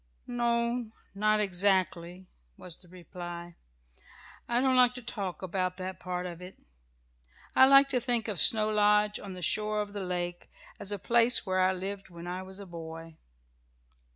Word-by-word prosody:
"No 235 Hz, -1 st, -1 dB, 0.2 s
not 215 Hz, +2 st, +2 dB
exactly," 185 Hz, -2 st, 0 dB, 0.3 s
was 175 Hz, -2 st, -6 dB
the 180 Hz, -, -16 dB
reply. 175 Hz, -1 st, -9 dB, 0.9 s
"I 240 Hz, 0 st, +2 dB
don't 260 Hz, 0 st, +2 dB
like 250 Hz, -1 st, +4 dB
to 250 Hz, -, -7 dB
talk 195 Hz, -6 st, -5 dB
about 185 Hz, 0 st, -2 dB
that 185 Hz, 0 st, -6 dB
part 180 Hz, 0 st, -4 dB
of 175 Hz, -1 st, -7 dB
it. 180 Hz, +1 st, -11 dB, 1.0 s
I 265 Hz, -, +7 dB
like 275 Hz, 0 st, +7 dB
to 255 Hz, -, +1 dB
think 240 Hz, -2 st, -1 dB
of 205 Hz, -6 st, 0 dB
Snow 215 Hz, +5 st, +7 dB
Lodge 210 Hz, 0 st, +3 dB
on 195 Hz, -2 st, -8 dB
the 180 Hz, -, -7 dB
shore 215 Hz, +3 st, +1 dB
of 205 Hz, -1 st, -4 dB
the 200 Hz, -2 st, -4 dB
lake 175 Hz, -1 st, -4 dB, 0.3 s
as 200 Hz, -, -3 dB
a 205 Hz, -, -1 dB
place 235 Hz, +4 st, +2 dB
where 185 Hz, -1 st, 0 dB
I 185 Hz, 0 st, +4 dB
lived 195 Hz, +1 st, -6 dB
when 170 Hz, -1 st, -10 dB
I 180 Hz, +1 st, -4 dB
was 190 Hz, 0 st, -10 dB
a 200 Hz, -, -8 dB
boy. 165 Hz, -2 st, -9 dB
195 Hz, 170 wpm, -29 LUFS, 180-215 Hz, 1.0 s, I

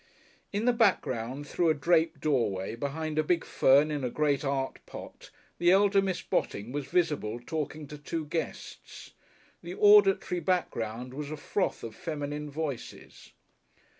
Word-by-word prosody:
In 210 Hz, +3 st, -1 dB
the 245 Hz, -, +4 dB
background 140 Hz, -, +1 dB
through 170 Hz, +1 st, +1 dB
a 155 Hz, -, +3 dB
draped 165 Hz, +2 st, +2 dB
doorway 115 Hz, -10 st, 0 dB
behind 155 Hz, +4 st, -3 dB
a -, -, +3 dB
big 170 Hz, +2 st, +1 dB
fern 140 Hz, +3 st, +4 dB
in 145 Hz, -2 st, -2 dB
a 125 Hz, -, 0 dB
great 145 Hz, +1 st, 0 dB
art 135 Hz, -1 st, -2 dB
pot -, -, -10 dB, 0.3 s
the 175 Hz, +1 st, +4 dB
elder 200 Hz, +1 st, +5 dB
Miss 190 Hz, -2 st, -2 dB
Botting 105 Hz, +4 st, -2 dB
was 140 Hz, -1 st, -4 dB
visible 145 Hz, -9 st, 0 dB
talking 155 Hz, +3 st, -4 dB
to 150 Hz, +1 st, -10 dB
two 155 Hz, +1 st, -4 dB
guests; 160 Hz, +2 st, -6 dB, 0.5 s
the 175 Hz, +2 st, -7 dB
auditory 200 Hz, -3 st, +5 dB
background 125 Hz, -9 st, -2 dB
was 145 Hz, +1 st, -5 dB
a 155 Hz, -, -5 dB
froth 185 Hz, +6 st, -2 dB
of 115 Hz, -, -6 dB
feminine 150 Hz, +1 st, -5 dB
voices.... 145 Hz, -4 st, -6 dB
150 Hz, 150 wpm, -29 LUFS, 135-175 Hz, 0.5 s, elder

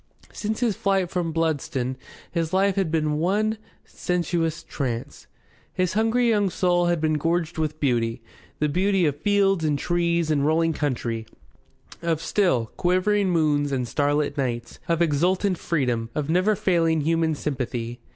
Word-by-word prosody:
Since 220 Hz, +2 st, -3 dB
his 230 Hz, -5 st, +1 dB
flight 195 Hz, -3 st, 0 dB
from 175 Hz, -3 st, -1 dB
Bludston 155 Hz, -5 st, -1 dB, 0.4 s
his 165 Hz, 0 st, -2 dB
life 195 Hz, 0 st, +3 dB
had 195 Hz, -4 st, 0 dB
been 155 Hz, -2 st, 0 dB
one 215 Hz, +6 st, +1 dB, 0.3 s
sensuous 170 Hz, -2 st, -2 dB
trance. 120 Hz, -5 st, -5 dB, 0.5 s
His 185 Hz, 0 st, 0 dB
hungry 225 Hz, +3 st, +2 dB
young 205 Hz, -3 st, +2 dB
soul 175 Hz, -1 st, +1 dB
had 175 Hz, -1 st, +1 dB
been 155 Hz, -1 st, +1 dB
gorged 165 Hz, +1 st, -1 dB
with 155 Hz, -1 st, -2 dB
beauty 120 Hz, -3 st, 0 dB, 0.3 s
the 150 Hz, -, +1 dB
beauty 185 Hz, +4 st, +2 dB
of 145 Hz, -3 st, +1 dB
fields 195 Hz, -3 st, +2 dB
and 150 Hz, -2 st, +1 dB
trees 170 Hz, +1 st, 0 dB
and 145 Hz, -2 st, +2 dB
rolling 165 Hz, +2 st, +2 dB
country, 120 Hz, -6 st, -2 dB, 0.7 s
of 165 Hz, -2 st, 0 dB
still, 145 Hz, -, +1 dB
quivering 185 Hz, +3 st, +2 dB
moons 150 Hz, -4 st, +2 dB
and 125 Hz, -3 st, -1 dB
starlit 145 Hz, +2 st, 0 dB
nights, 120 Hz, -3 st, -3 dB
of 170 Hz, -1 st, +2 dB
exultant 180 Hz, +5 st, +1 dB
freedom, 125 Hz, -8 st, -1 dB
of 150 Hz, 0 st, -1 dB
never 185 Hz, +5 st, +3 dB
failing 165 Hz, -4 st, +2 dB
human 165 Hz, +1 st, +1 dB
sympathy. 125 Hz, -5 st, -4 dB
165 Hz, 150 wpm, -24 LUFS, 145-185 Hz, 0.7 s, life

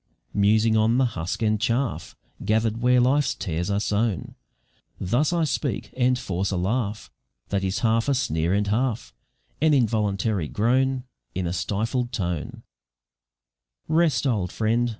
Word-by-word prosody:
Musing 110 Hz, +2 st, +3 dB
on 110 Hz, +2 st, +3 dB
the 130 Hz, -, +4 dB
husk 95 Hz, -2 st, -3 dB
and 110 Hz, -1 st, +1 dB
chaff 120 Hz, +3 st, -1 dB, 0.3 s
Gather'd 110 Hz, +2 st, +1 dB
where 125 Hz, +1 st, +4 dB
life's 135 Hz, +4 st, +2 dB
tares 90 Hz, 0 st, -3 dB
are 100 Hz, 0 st, +1 dB
sown, 105 Hz, -2 st, -1 dB, 0.7 s
Thus 120 Hz, -, +1 dB
I 170 Hz, -1 st, +1 dB
speak, 140 Hz, -5 st, -2 dB
and 125 Hz, 0 st, +2 dB
force 95 Hz, -5 st, -2 dB
a 95 Hz, -, -1 dB
laugh 105 Hz, +3 st, -2 dB, 0.4 s
That 100 Hz, -1 st, -1 dB
is 95 Hz, +1 st, -1 dB
half 115 Hz, +3 st, +2 dB
a 140 Hz, -, +3 dB
sneer 80 Hz, -9 st, 0 dB
and 100 Hz, +1 st, +2 dB
half 115 Hz, +3 st, -1 dB, 0.5 s
An 155 Hz, -1 st, +4 dB
involuntary 105 Hz, -, +1 dB
groan, 130 Hz, -, +1 dB, 0.3 s
In 90 Hz, 0 st, -1 dB
a 85 Hz, -, -2 dB
stifled 110 Hz, +8 st, -1 dB
tone 90 Hz, -, -3 dB, 1.2 s
"Rest, 155 Hz, -7 st, +2 dB
old 105 Hz, -9 st, 0 dB
friend! 115 Hz, +3 st, +1 dB
110 Hz, 145 wpm, -24 LUFS, 100-125 Hz, 1.2 s, the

